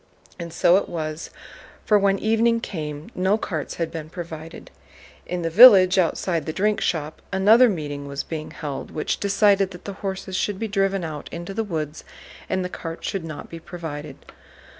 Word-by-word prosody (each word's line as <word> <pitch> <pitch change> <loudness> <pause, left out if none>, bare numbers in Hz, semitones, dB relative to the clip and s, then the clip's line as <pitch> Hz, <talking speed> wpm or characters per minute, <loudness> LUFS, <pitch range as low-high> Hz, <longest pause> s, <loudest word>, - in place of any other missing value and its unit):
And 170 -1 -6
so 175 +2 +4
it - - -2
was, 155 -1 -4 0.6
for 210 -1 +4
when 195 0 +2
evening 225 +2 +2
came 150 -7 -6
no 190 +3 +2
carts 160 -9 -4
had 165 -1 -2
been 160 -2 -6
provided. 165 -2 -8 0.6
In 180 -1 -3
the 165 - 0
village, 190 -3 +9
outside 170 -2 0
the - - -1
drink 210 +4 +1
shop, 155 -2 -2
another 215 +6 +6
meeting 145 -6 -4
was 140 0 -4
being 155 -2 -6
held, 145 -3 -6
which 155 - -2
decided 200 -1 +3
that 180 -2 -12
the 200 - -5
horses 190 -1 -4
should 200 +1 -1
be 225 - -3
driven 195 -2 0
out 155 -3 -6
into 175 +3 -6
the 225 - -1
woods 155 -6 -4 0.5
and 185 -1 0
the - - -1
carts 165 -2 -6
should 195 -4 -3
not 155 -2 -7
be 165 - -9
provided. 155 -5 -7
175 Hz, 180 wpm, -23 LUFS, 160-195 Hz, 0.6 s, village